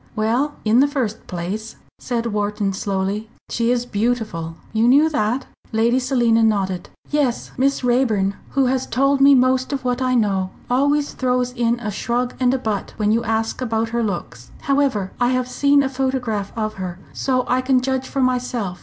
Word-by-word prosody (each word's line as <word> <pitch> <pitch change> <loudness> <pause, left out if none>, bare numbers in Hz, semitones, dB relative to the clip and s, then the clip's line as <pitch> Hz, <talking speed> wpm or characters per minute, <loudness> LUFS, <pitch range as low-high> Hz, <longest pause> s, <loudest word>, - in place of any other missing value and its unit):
"Well, 240 +7 +1
in 220 +3 +4
the 280 - +5
first 250 -7 -3
place," 195 +5 -5 0.2
said 235 -2 -2
Wharton, 205 -1 -1
slowly, 195 +2 -2 0.2
"she 230 0 0
is 245 0 +1
beautiful 215 -8 -2 0.2
you 225 +1 +3
knew 290 +5 +5
that?" 255 -3 0 0.3
Lady 230 +3 +2
Selina 240 -3 +2
nodded. 195 -5 0 0.2
"Yes. 285 -5 0
Miss 275 +1 +1
Raeburn, 235 -6 +2 0.2
who 270 - +5
has 255 0 0
told 275 +2 +2
me 280 0 +8
most 255 +1 +2
of 270 -2 -3
what 250 +1 0
I 255 -1 +1
know, 195 -5 +1 0.2
always 285 +3 +2
throws 250 -1 0
in 240 -1 0
a 215 -3 -3
shrug 240 +4 -1
and 250 -1 +3
a 265 - +1
'but' 220 -5 -3
when 210 -1 +1
you 230 +2 +2
ask 225 +2 -1
about 225 -2 -1
her 235 +1 -1
looks. 175 - -4
However, 275 -9 +1
I 245 - +4
have 255 0 0
seen 280 +2 +3
a - - +1
photograph 255 -6 -2
of 215 -1 -1
her, 180 -1 -4 0.2
so 255 -2 0
I 255 +1 +2
can 255 0 +3
judge 260 0 -2
for 275 - -2
myself. 245 -7 -1
245 Hz, 180 wpm, -21 LUFS, 215-260 Hz, 0.3 s, me